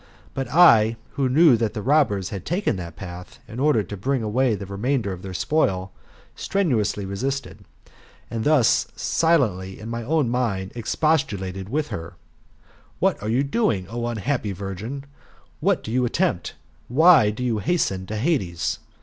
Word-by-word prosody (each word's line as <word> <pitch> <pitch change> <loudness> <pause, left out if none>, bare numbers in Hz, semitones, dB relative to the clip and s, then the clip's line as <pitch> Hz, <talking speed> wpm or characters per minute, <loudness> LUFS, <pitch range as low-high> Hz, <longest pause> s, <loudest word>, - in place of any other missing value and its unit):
But 135 -1 -3
I, 115 -10 +6 0.2
who 135 -2 0
knew 150 0 +6
that 110 -2 -2
the 105 - -3
robbers 125 - +2
had 95 -4 -6
taken 175 - -1
that 85 -2 -7
path, 90 -1 -9
in 115 - -8
order 140 -6 +3
to 100 - -7
bring 125 +5 -1
away 115 +2 +1
the 100 - -7
remainder 100 +2 -1
of 90 - -9
their 95 - -7
spoil, 95 - 0 0.4
strenuously 125 - 0
resisted, 130 +8 -4 0.6
and 115 -1 -4
thus 145 -5 +3
silently, 110 - +1
in 110 - -8
my 120 0 -3
own 145 +3 +1
mind, 115 -6 -1
expos 140 +5 +1
tulated 95 -3 -6
with 150 +4 -1
her: 85 +1 -6 0.8
"What - - +1
are 105 - -3
you 125 +5 +2
doing, 140 - 0
O 120 +1 -3
unhappy 120 -1 -2
virgin? 100 +8 -6 0.6
What - - +1
do 110 - -6
you 125 +1 +1
attempt? 120 - -1 0.3
Why 150 -3 +6
do 110 +4 -4
you 115 -4 0
hasten 95 - -1
to 110 - -4
Hades 105 - -1
115 Hz, 160 wpm, -23 LUFS, 100-140 Hz, 0.8 s, I